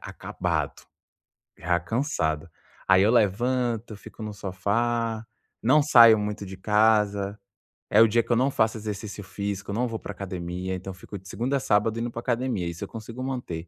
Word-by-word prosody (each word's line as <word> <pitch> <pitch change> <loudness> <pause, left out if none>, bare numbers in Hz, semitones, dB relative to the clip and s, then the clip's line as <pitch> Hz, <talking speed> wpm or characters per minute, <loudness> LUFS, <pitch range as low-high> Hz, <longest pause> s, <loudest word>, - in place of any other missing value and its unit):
acabado, - - -3 0.8
já 90 0 0
cansado. 85 - -1 0.4
Aí 95 0 +6
eu 105 - +4
levanto, 120 +1 +1
fico 105 +2 -11
no 105 -1 -5
sofá, 110 +4 -1 0.4
não 145 +6 +4
saio 115 -6 +8
muito 105 0 -3
de 95 0 -9
casa. 105 0 +2 0.5
É 105 - +6
o 115 - +8
dia 115 +2 +2
que - - -6
eu - - +5
não 130 +4 +3
faço 110 -2 +1
exercício 105 -1 -6
físico, 100 0 -4
não 120 +4 0
vou 115 -1 -4
para - - -7
academia, 90 -1 -4
então, 95 +1 -6
fico 95 +2 -9
de 95 - -17
segunda 125 +7 -1
a - - -1
sábado 110 -1 +1
indo 120 +1 -3
para 115 - -5
academia, 120 -6 -1
isso 85 +2 -5
eu - - -5
consigo 115 +3 -8
manter. 120 -11 -4
105 Hz, 175 wpm, -26 LUFS, 95-115 Hz, 0.8 s, saio